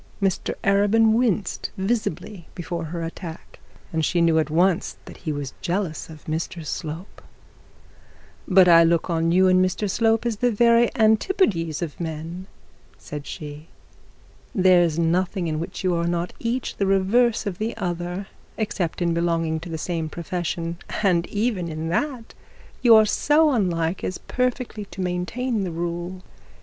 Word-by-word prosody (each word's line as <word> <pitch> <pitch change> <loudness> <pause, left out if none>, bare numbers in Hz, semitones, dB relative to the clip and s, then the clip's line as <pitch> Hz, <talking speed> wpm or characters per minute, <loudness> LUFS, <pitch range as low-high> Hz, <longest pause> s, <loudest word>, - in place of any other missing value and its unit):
Mr 195 -3 0
Arabin 205 +3 +4
winced 220 -4 0
visibly 190 -3 -2
before 170 -1 -4
her 165 +1 -5
attack, 165 0 -8 0.3
and 160 0 0
she 175 +3 +1
knew 165 -1 +4
at 155 - 0
once 175 +3 +1
that - - -11
he 160 - -4
was 145 -2 -4
jealous 175 -3 -2
of 155 -2 -12
Mr 160 +1 -4
Slope. 160 +5 -6 1.3
'But 185 -1 +6
I 170 -1 +8
look 170 +1 +2
on 165 0 +1
you 185 +2 +5
and 185 0 +5
Mr 185 +3 -1
Slope 225 +3 +2
as 230 -3 -1
the 245 +3 +2
very 235 +1 +4
antipodes 215 - +2
of 155 -4 -6
men,' 165 +3 -5 0.5
said 145 -1 -8
she. 150 +1 -8 0.9
'There 185 -3 +5
is 165 -2 +1
nothing 175 +2 +1
in 155 -2 -2
which 170 - -5
you 185 -1 +2
are 170 0 0
not 175 +1 -2
each 240 +2 -2
the 200 - +1
reverse 215 +5 +2
of 195 -4 -4
the 225 +2 -3
other, 175 0 -3 0.3
except 185 -6 -2
in 170 -1 +1
belonging 165 -1 0
to 165 +2 -9
the 160 - -4
same 165 -1 -3
profession; 170 0 -4 0.2
and 175 -4 +2
even 205 -4 -1
in 160 0 -4
that 250 - -2 0.5
you 235 -3 +7
are 220 0 +7
so 300 +8 +3
unlike 180 -7 0
as 185 - -2
perfectly 250 -4 -2
to 190 -1 -13
maintain 195 +6 -1
the 185 - -2
rule. 175 +2 -4
180 Hz, 160 wpm, -23 LUFS, 165-210 Hz, 1.3 s, I